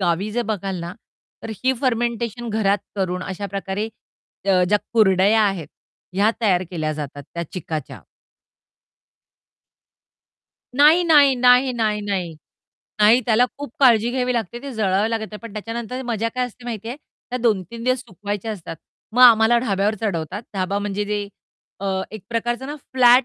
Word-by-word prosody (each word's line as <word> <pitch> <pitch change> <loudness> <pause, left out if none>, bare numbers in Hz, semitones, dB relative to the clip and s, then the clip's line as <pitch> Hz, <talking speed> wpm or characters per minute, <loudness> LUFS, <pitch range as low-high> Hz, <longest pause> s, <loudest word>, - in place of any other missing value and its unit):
गावी 185 +3 0
जर 240 +1 0
बघाल 195 -3 -4
ना 170 +1 -5 0.5
तर 225 - -6
ही 260 - +4
फर्मेंटेशन 235 -2 -1
घरात 205 -2 +1 0.2
करून 180 -1 -1
अशा 195 +2 -5
प्रकारे 195 +2 -3 0.6
ज 185 -2 +4
ज्या 210 +1 +4
कुरडया 210 0 +4
आहेत 195 -6 -1 0.5
ह्या 205 +3 +3
तयार 185 -5 +3
केल्या 155 -3 -2
जातात 145 -1 -6
त्या 170 - -2
चिकाच्या. 160 -5 -5 2.8
नाही, 310 +5 +6
नाही, 290 -5 +6
नाही, 250 +1 +5
नाही, 215 -3 0
नाही. 190 -5 -3 0.7
नाही. 220 +4 +6
त्याला 235 +2 +4
खूप 285 -5 -7
काळजी 235 -3 +5
घ्यावी 250 0 0
लागते 235 +1 -3
ते 280 - -6
जळावी 210 0 +1
लागत 225 -1 -1
नाही, 210 - -8
पण 230 -3 -9
त्याच्यानंतर 230 +4 -5
मजा 230 -1 -1
काय 250 0 0
असते 245 0 -15
माहितीये 230 +1 -5
त्या 255 -4 -9
2-3 230 0 -1
दिवस 255 0 +2
सुकवायच्या 205 -1 -5
असतात. 165 -4 -8 0.4
मग 250 +2 +4
आम्हाला 235 0 +7
ढाब्यावर 210 -2 0
चढवतात. 190 0 -3
ढाबा 195 +1 -1
म्हणजे 205 0 -2
जे 205 -1 -3 0.5
अ, 190 -1 -1
एक 215 -3 -8
प्रकारचं 240 +3 -2
ना 290 - -5 0.2
फ्लॅट 250 0 +6
215 Hz, 150 wpm, -22 LUFS, 195-240 Hz, 2.8 s, आम्हाला